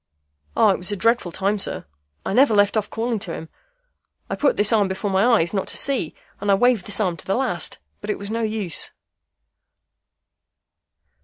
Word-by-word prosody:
"Ah! 215 - +6
it - - -1
was 180 +3 -2
a - - 0
dreadful 230 -3 +1
time, 200 +4 0
sir. - - -2 0.4
I - - -1
never 255 -1 +5
left 205 +1 +4
off 210 -1 0
calling 230 0 -2
to 190 -5 -4
him. 160 - -8 0.8
I - - 0
put 290 - +2
this 210 +2 +3
arm 210 -3 +4
before 190 +2 -3
my 190 +1 +3 0.2
eyes 170 +3 -1
not 195 - -1
to - - -3
see, 265 - +1 0.2
and 205 - -3
I 200 - +6
waved 240 -2 +2
this 205 0 +1
arm 180 -5 0
to - - -12
the 195 - +1
last; 240 -10 -1 0.2
but - - -8
it - - 0
was 200 +1 -6
no 230 +1 -1
use." 215 -7 -2
205 Hz, 200 wpm, -22 LUFS, 190-225 Hz, 0.8 s, Ah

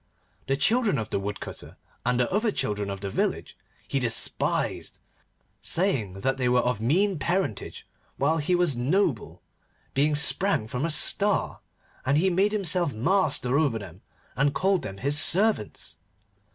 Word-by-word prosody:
The 135 0 +1
children 220 - +2
of 110 -2 -4
the - - 0
Woodcutter, 100 +1 -7 0.3
and 125 +1 0
the 125 - 0
other 215 +2 +1
children 105 - -2
of 100 -1 -6
the 100 - -3
village, - - -2 0.3
he 135 - -1
despised, 115 -3 0 0.6
saying 115 - 0
that 135 +3 0
they 125 -2 0
were 125 0 +3
of 125 -3 -1
mean 180 - +1
parentage, 170 - -2 0.3
while 150 +4 +1
he 165 +5 +1
was 175 -6 +2
noble, 120 - -1 0.5
being 150 +2 +2
sprang 150 - +2
from 125 +6 -3
a - - -1
Star, 200 +6 +2 0.4
and 140 +3 +2
he 185 +4 +2
made 195 +4 +2
himself 180 -6 +1
master 140 - +1
over 140 -8 +1
them, 95 -3 -10 0.3
and 140 +1 +1
called 190 -1 +2
them 95 - -7
his 140 +7 0
servants. 170 - 0
140 Hz, 150 wpm, -26 LUFS, 115-185 Hz, 0.6 s, were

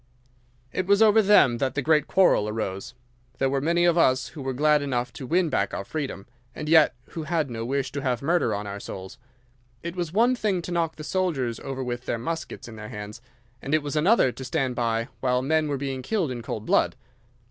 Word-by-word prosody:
"'It 185 0 -2
was 200 0 +4
over 220 0 +6
them 190 - +5
that 130 -1 -1
the 140 - 0
great 150 0 +3
quarrel 180 - +3
arose. 105 +1 -4 0.4
There 135 0 +1
were 135 -1 0
many 170 +3 +2
of 175 0 +3
us 130 -4 +3
who 155 - -9
were 135 0 -2
glad 150 +3 +3
enough 125 -3 -2
to 130 - -8
win 175 +3 +2
back 100 -8 0
our - - -3
freedom, 135 -10 -4 0.3
and 150 - -5
yet 155 -5 +5
who 165 - -6
had 155 -3 -1
no 115 -1 -4
wish 135 +2 -2
to 140 - -4
have 125 -2 -1
murder 165 -5 +2
on 105 +1 -4
our 100 0 -6
souls. 95 -1 -8 0.6
It 170 +1 -5
was 175 -3 -3
one 235 +7 +3
thing 200 -7 -1
to 180 - -6
knock 165 -2 0
the 155 - -8
soldiers 150 -11 -1
over 135 -1 -5
with 120 0 -5
their - - 0
muskets 160 +5 -5
in 110 -2 -10
their 105 0 -8
hands, 105 -1 -8 0.4
and 140 +3 0
it 155 - +1
was 145 +1 -4
another 160 - +4
to 130 - -9
stand 130 -1 -1
by 115 -1 0
while 125 -1 +1
men 155 +2 +1
were 145 -1 -1
being 135 -1 -4
killed 175 - -1
in 120 -2 -5
cold 110 -1 -5
blood. - - +2
140 Hz, 225 wpm, -25 LUFS, 120-165 Hz, 0.6 s, over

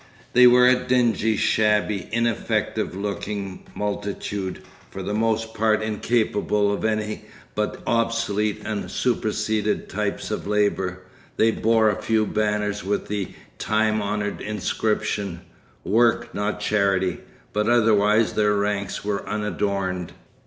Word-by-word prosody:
They 125 0 +8
were 125 0 +6
a 130 - +7
dingy, 120 -4 +2
shabby, 105 -3 +1
ineffective 115 -5 -1
looking 100 -1 -4
multitude, 100 -2 -3 0.3
for - - -7
the 105 - -3
most 110 +1 0
part 110 0 +2
incapable 105 -2 +1
of - - -4
any 110 -1 -1 0.3
but 105 0 -2
obsolete 110 -2 0
and 105 -2 -3
superseded 110 -3 -1
types 105 +1 -3
of 105 - -3
labour. 95 -3 0 0.3
They 115 - +4
bore 110 -1 +3
a 100 - -5
few 110 -1 +2
banners 105 -1 -1
with 100 +2 -2
the 100 -2 -2 0.3
time 110 0 +1
honoured 105 0 -2
inscription: 105 -3 -2 0.4
'Work, 115 +3 +2
not 105 +1 -2
Charity,' 95 -3 +1 0.3
but 105 +1 +1
otherwise 110 -2 +4
their 105 -1 +2
ranks 100 -1 -2
were 105 -1 -1
unadorned. 100 -4 -2
105 Hz, 120 wpm, -23 LUFS, 100-110 Hz, 0.4 s, They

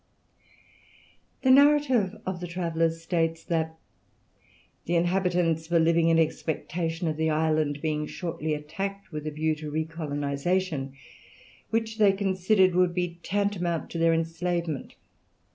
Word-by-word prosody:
The 260 - +5
narrative 265 -7 +4
of 185 -1 -3
the 175 - -4
travellers 165 -1 -1
states 165 -1 0
that 160 -1 -1 1.1
"the 175 - 0
inhabitants 175 -2 +1
were 170 - +3
living 165 0 +3
in 165 - +4
expectation 165 +1 -1
of 155 -1 -1
the 160 0 +1
island 155 -2 0
being 150 -1 -1
shortly 165 -3 -3
attacked 195 +7 -5
with 150 -1 -5
the - - -1
view 155 +1 0
to 150 0 -6
recolonization, 155 0 -2 0.8
which 225 0 -2
they 205 -2 +6
considered 190 -1 +2
would 180 -1 +2
be 175 -1 -2
tantamount 190 -5 -1
to 170 - -4
their 165 0 +4
enslavement. 165 -1 -2
165 Hz, 125 wpm, -27 LUFS, 160-185 Hz, 1.1 s, they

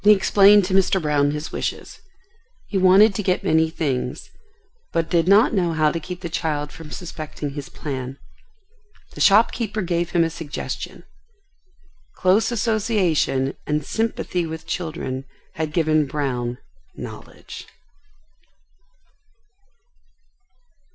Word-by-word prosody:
He 210 +1 +8
explained 200 0 +5
to 185 - -3
Mr. 190 0 +3
Brown 150 -3 +1
his 150 +2 -4
wishes. - - -4 0.7
He - - -7
wanted 190 +3 +6
to 210 - -2
get 185 -2 0
many 160 0 +3
things, 135 -6 -3 0.6
but 165 -1 -1
did 170 -1 +2
not 205 +5 +5
know 175 -5 +1
how 155 -1 +2
to 165 - -3
keep 180 +3 -8
the 175 - -4
child 150 -3 -2
from 160 -2 -11
suspecting 155 -3 -6
his 145 0 -7
plan. 130 -2 -5 1.0
The - - -7
shopkeeper 220 +1 +3
gave 170 -1 -1
him 170 -1 +2
a 165 - -1
suggestion. 160 -2 -6 1.1
Close 190 +6 +2
association 200 - +1
and 150 -1 -1
sympathy 220 -5 -1
with 160 0 -7
children 150 -6 -4 0.3
had 155 -1 -3
given 155 -2 +2
Brown 125 -4 -2 0.4
knowledge. - - -10
165 Hz, 120 wpm, -22 LUFS, 150-190 Hz, 1.1 s, He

